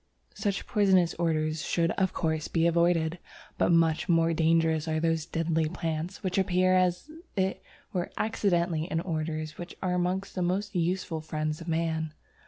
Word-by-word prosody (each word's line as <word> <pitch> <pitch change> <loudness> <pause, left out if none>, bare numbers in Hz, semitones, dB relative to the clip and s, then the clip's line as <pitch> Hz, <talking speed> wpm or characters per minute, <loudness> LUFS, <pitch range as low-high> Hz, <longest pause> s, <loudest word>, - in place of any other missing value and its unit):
Such 205 -2 -2
poisonous 190 -6 +3
orders 155 -2 0
should 170 -1 +1
of 190 -2 +1
course 160 -2 -1
be 165 -1 +1
avoided, 170 0 +2 0.4
but - - +3
much 165 +1 +3
more 165 -1 +3
dangerous 160 -1 +2
are 155 0 0
those 165 -1 0
deadly 165 -2 0
plants 165 +3 -4
which 185 0 0
appear 185 0 +3
as 185 - +1 0.3
it 190 0 0 0.3
were 180 -2 -1
accidentally 175 -7 +1
in 165 -2 -1
orders 155 -2 -3
which 175 0 -7
are 185 -2 -1
amongst 180 +2 -1
the 185 - -2
most 195 +4 -1
useful 175 -2 -1
friends 155 0 -3
of 165 - -9
man. 160 -1 -1
170 Hz, 160 wpm, -28 LUFS, 160-185 Hz, 0.4 s, poisonous